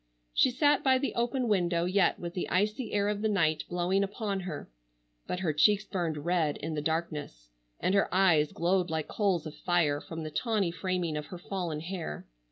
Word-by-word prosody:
She - - +5
sat 290 +3 +3
by 260 -1 +5
the 275 +2 -2
open 240 +1 0
window 175 -5 +2
yet 185 0 +2
with 170 0 -6
the 180 - -3
icy 210 +5 0
air 205 -1 +1
of 210 0 -1
the 220 - +1
night 160 -6 +1
blowing 180 +3 +1
upon 200 0 -2
her, 175 -5 -6 0.6
but 180 - -3
her 165 -5 0
cheeks 205 +7 +4
burned 165 -7 -3
red 170 -4 +1
in 160 +2 -4
the 150 - -2
darkness, 150 - -3 0.3
and 185 - +1
her 200 - +2
eyes 175 -6 +4
glowed 180 +1 +1
like 160 -2 -2
coals 195 -6 0
of 155 - -6
fire 155 -5 +1
from 165 -1 -7
the 155 - -5
tawny 210 -3 0
framing 180 -3 -2
of 150 - -5
her 180 - -8
fallen 175 -4 -4
hair. 170 - -5
180 Hz, 195 wpm, -30 LUFS, 160-200 Hz, 0.6 s, She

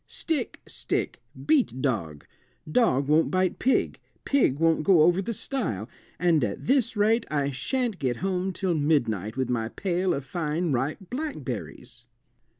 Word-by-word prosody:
"Stick, 320 -3 -3
stick, - - -3 0.2
beat 280 - +2
dog; 90 - -2 0.4
dog 155 - +2
won't 155 +2 +3
bite 185 -1 0
pig, 265 - +1 0.3
pig 260 - +2
won't 165 0 +3
go 170 -3 +5
over 175 +3 +4
the 215 - -3
stile, 195 - -3 0.3
and 170 -5 +3
at - - -3
this 250 -4 +2
rate 220 +3 +3
I 145 -2 0
shan't 240 - -2
get 125 -5 -1
home 190 +2 -1
till 185 0 -1
midnight 120 - 0
with 130 -1 -1
my 115 -2 -1
pail 180 - -1
of 140 - -5
fine 160 +2 -2
ripe 140 +9 -2
blackberries." 125 - -6
165 Hz, 150 wpm, -26 LUFS, 130-200 Hz, 0.4 s, go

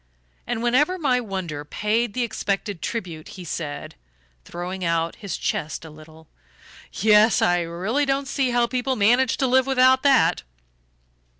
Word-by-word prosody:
And 240 -1 -2
whenever 290 +10 +2
my 260 -7 +1
wonder 185 -9 -5
paid 210 +8 -1
the 250 - 0
expected 200 -5 -3
tribute 175 -9 -5
he 185 - -8
said, 150 -2 -5 0.5
throwing 180 +2 -6
out 165 -1 -1
his 200 -4 -5
chest 155 +1 -3
a 160 - -10
little: 155 +1 -15 0.6
"Yes, 215 +2 +4
I 175 0 +3
really 190 +12 -2
don't 275 0 0
see 270 -2 0
how 240 0 +2
people 255 +2 -2
manage 240 +4 +3
to 270 - +1
live 260 +1 +3
without 260 0 +4
that." 265 - +3
215 Hz, 145 wpm, -23 LUFS, 170-255 Hz, 0.6 s, Yes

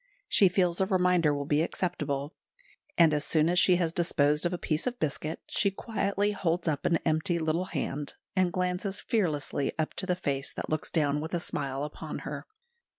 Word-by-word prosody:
She 195 - +5
feels 180 0 +1
a 190 - +2
reminder 180 -5 +3
will 145 -1 -2
be 145 +1 +2
acceptable; 150 -5 -2 0.6
and 165 -3 +6
as 150 0 +1
soon 155 +1 +2
as 175 0 +3
she 180 +1 +5
has 170 -2 0
disposed 150 -2 +2
of - - -4
a 180 - -2
piece 155 +4 -1
of 250 0 -3
biscuit, 155 +1 -2
she 200 - +2
quietly 200 0 -1
holds 175 -3 -1
up 150 -3 0
an 170 - +3
empty 160 +3 +1
little 160 +2 0
hand, 145 -3 -4 0.2
and 185 -2 +2
glances 180 +2 -1
fearlessly 155 -9 -1
up 155 -1 -1
to 185 - -3
the 180 - +2
face 140 -6 -2
that - - -5
looks 155 0 -1
down 150 -2 +1
with 160 +3 -3
a - - 0
smile 140 -4 -3
upon 150 - -6
her. - - -6
170 Hz, 195 wpm, -29 LUFS, 150-180 Hz, 0.6 s, and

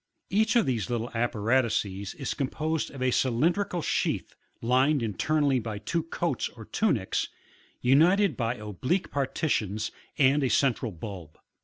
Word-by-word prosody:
Each 220 +4 +2
one 235 - +6
of - - -3
these 120 -3 -1
little 120 0 -2
apparatuses 110 -4 0
is 135 -4 -3
composed 155 +3 -2
of 135 -2 -6
a 130 - +2
cylindrical 170 - +1
sheath, - - -1 0.3
lined 130 +3 +2
internally 140 +5 +1
by 110 -2 -4
two 135 +11 -1
coats 165 -3 -2
or 110 -2 -12
tunics, 135 - 0 0.5
united 165 +7 +4
by 115 +1 -1
oblique 115 - -2
partitions, 110 -7 -1 0.3
and 140 +1 +4
a 130 - +2
central 120 -1 +1
bulb. 90 -3 -8
130 Hz, 140 wpm, -28 LUFS, 110-155 Hz, 0.5 s, one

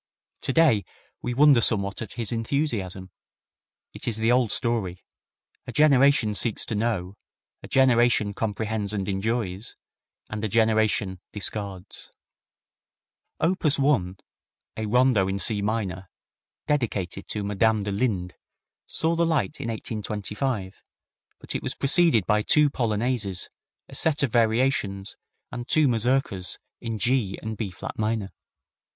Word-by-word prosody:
Today 135 -7 +3 0.4
we 125 - -3
wonder 140 -3 +6
somewhat 100 -4 +1
at 110 - -6
his 115 -2 -3
enthusiasm. 115 - -2 0.8
It - - -7
is 115 -3 +1
the 110 +2 +2
old 125 -3 +3
story 105 -7 -1 0.6
a - - -4
generation 140 -6 +4
seeks 110 +1 +2
to - - -4
know, 105 -4 -2 0.4
a - - -10
generation 120 -5 +3
comprehends 105 -1 -2
and 100 -2 -2
enjoys, 100 0 -2 0.5
and 110 0 -5
a - - +1
generation 110 -3 +1
discards. 100 -3 -4 1.3
Opus 165 -4 +1
1, 115 -11 +1 0.6
a 110 -1 -3
Rondo 120 -4 +3
in 95 0 -1
C 105 +1 +3
minor, 100 -4 -3 0.6
dedicated 105 - -2
to 105 - -3
Madame 105 +1 +1
de 100 - -3
Linde, 100 -5 -1 0.5
saw 160 +1 +1
the 170 - +2
light 160 -2 0
in - - -4
1825, 105 -1 -4 0.5
but - - -7
it - - -2
was - - -4
preceded 145 - +4
by 105 0 +2
two 150 +6 +4
polonaises, 110 -5 -1 0.4
a - - -14
set 155 -2 +1
of 135 - +1
variations, 110 -4 +1 0.4
and 120 0 -6
two 155 -2 +4
mazurkas 115 -6 0 0.2
in 115 -2 -4
G 110 -2 +1
and 110 0 -4
B 105 -2 -3
flat 90 - -8
major. 110 -2 -1
110 Hz, 130 wpm, -25 LUFS, 100-125 Hz, 1.3 s, wonder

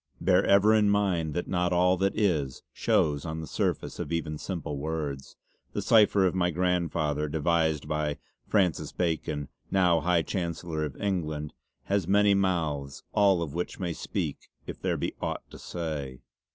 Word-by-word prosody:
Bear 95 +1 +4
ever 100 +2 +6
in 105 -2 +4
mind 90 -7 +1
that 90 - -2
not 90 -1 0
all 90 +1 +4
that 95 +2 0
is 80 -11 0
shows 75 -2 +1
on 80 -1 -4
the 80 - -5
surface - - -2
of - - -4
even 80 -2 -2
simple 75 -3 -4
words. 75 -3 -4 0.4
The - - -1
cipher 105 -3 +5
of 90 - +2
my 90 -1 +1
Grandfather 85 -4 0
devised 80 -1 +1
by 75 -1 -1 0.3
Fr. - - +1 0.4
Bacon 80 -4 -1 0.2
now 90 -3 +3
High 85 -1 +2
Chancellor 85 -3 -3
of 70 -4 -8
England 80 -7 -2 0.3
has 100 -4 0
many 100 +1 +5
mouths, 80 -8 -1
all 100 -5 +4
of 75 -4 -6
which 90 +1 -4
may 90 -3 -2
speak - - -4 0.2
if - - -8
there - - 0
be - - -2
aught - - -3
to - - -11
say. 75 -7 -5
85 Hz, 165 wpm, -28 LUFS, 75-95 Hz, 0.4 s, ever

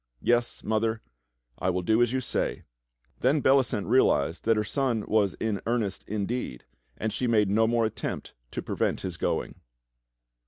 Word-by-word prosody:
Yes, 120 0 +1
Mother, 110 +1 0 0.6
I 90 - +1
will 90 0 -1
do 110 +5 +3
as 120 -1 +3
you 130 0 0
say." - - -2 0.6
Then 135 +5 +3
Bellicent 130 -6 +3
realized 90 - +2
that 115 -1 +4
her 105 - +2
son 120 0 -1
was 105 -3 +2
in 110 -3 -2
earnest 115 -5 -1
indeed, 105 - -3 0.3
and 110 -1 -2
she 125 - -1
made 105 -4 +3
no 110 +2 +4
more 115 0 +2
attempt 110 - -4 0.2
to - - -5
prevent - - -1
his 95 -3 -4
going. - - -2
110 Hz, 160 wpm, -27 LUFS, 100-120 Hz, 0.6 s, that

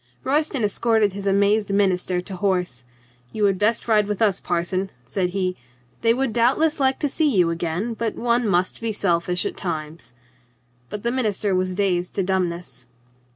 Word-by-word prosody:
Royston 285 -2 0
escorted 215 -1 +2
his 200 0 -5
amazed 200 +1 +2
minister 185 -2 +1
to 190 +1 -7
horse. 180 - -1 0.5
"You 215 -1 0
had 195 -2 +2
best 215 +3 +1
ride 210 -2 +3
with 210 -2 -2
us, 205 -5 +2
parson," 180 +2 -1 0.2
said 180 +8 -1
he. 185 -1 -1 0.5
"They 230 - +4
would 255 -1 0
doubtless 270 +7 +2
like 265 -1 +2
to 295 - +2
see 300 +2 +1
you 180 -9 +3
again, 170 +7 -2
but 225 0 -3
one 235 0 +1
must 185 +1 0
be 225 -1 -2
selfish 180 -2 0
at - - -3
times." 155 -6 -5 0.7
But 210 - -6
the 235 - +1
minister 215 -5 0
was 185 0 0
dazed 180 -3 0
to 195 - +1
dumbness. 175 -8 -2
200 Hz, 170 wpm, -23 LUFS, 180-225 Hz, 0.7 s, They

